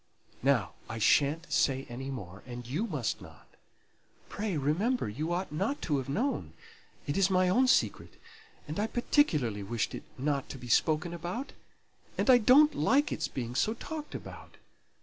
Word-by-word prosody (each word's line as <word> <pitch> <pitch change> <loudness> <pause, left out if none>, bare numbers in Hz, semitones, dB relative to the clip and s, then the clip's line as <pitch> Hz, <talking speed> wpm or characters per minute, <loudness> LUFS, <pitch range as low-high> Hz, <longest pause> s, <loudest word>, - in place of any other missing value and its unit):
Now, 125 -7 +2 0.2
I 110 - -4
sha'n't 145 +8 +2
say 135 0 +2
any 130 +3 -6
more; 100 -8 -7
and 120 0 -7
you 155 - -2
must 145 - -2
not. - - -14 0.8
Pray 205 -5 -2
remember 175 - 0
you 150 +11 -3
ought 180 0 -2
not 195 - -1
to 145 -4 +1
have 135 - -6
known; 245 - -1 0.5
it 145 +3 -2
is 195 -1 +4
my 185 -1 +3
own 255 +8 +4
secret, - - +1 0.5
and 150 +6 -4
I 210 - +1
particularly 155 - +1
wished 110 +2 -2
it - - -5 0.2
not 140 0 -1
to - - -7
be 125 -1 -10
spoken 160 +8 +2
about; 175 - -5 0.6
and 265 - +4
I 245 - +7
don't 280 +7 +6
like 290 +2 +2
its - - -1
being 120 -2 -5
so 215 - +1
talked 305 +4 -7
about. - - -10
155 Hz, 170 wpm, -30 LUFS, 130-220 Hz, 0.8 s, I